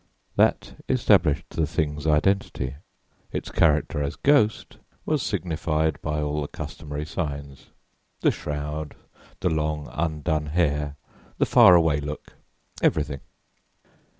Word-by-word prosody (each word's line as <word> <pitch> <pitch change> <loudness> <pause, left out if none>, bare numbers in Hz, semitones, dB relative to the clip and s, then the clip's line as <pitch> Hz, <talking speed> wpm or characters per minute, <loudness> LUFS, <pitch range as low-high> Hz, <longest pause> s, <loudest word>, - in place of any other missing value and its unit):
That - - +1
established 90 - +3
the 80 -2 0
thing's 75 -1 -2
identity; 75 -4 +1 0.6
its - - -4
character 75 -1 +2
as 70 0 -2
ghost 135 -8 +2 0.3
was 155 -3 +1
signified 80 - -1
by 75 0 -2
all 75 0 -1
the 70 - -3
customary 75 0 -6
signs 70 -4 -5 0.5
the - - +4
shroud, 75 +1 -5 0.5
the - - +2
long, 75 -1 -1
undone 80 -1 -1
hair, 75 -3 0 0.4
the - - +3
'far 90 - +7
away 80 -3 +3
look' 75 +1 -7 0.5
everything. 70 -2 +1
75 Hz, 115 wpm, -25 LUFS, 75-85 Hz, 0.6 s, far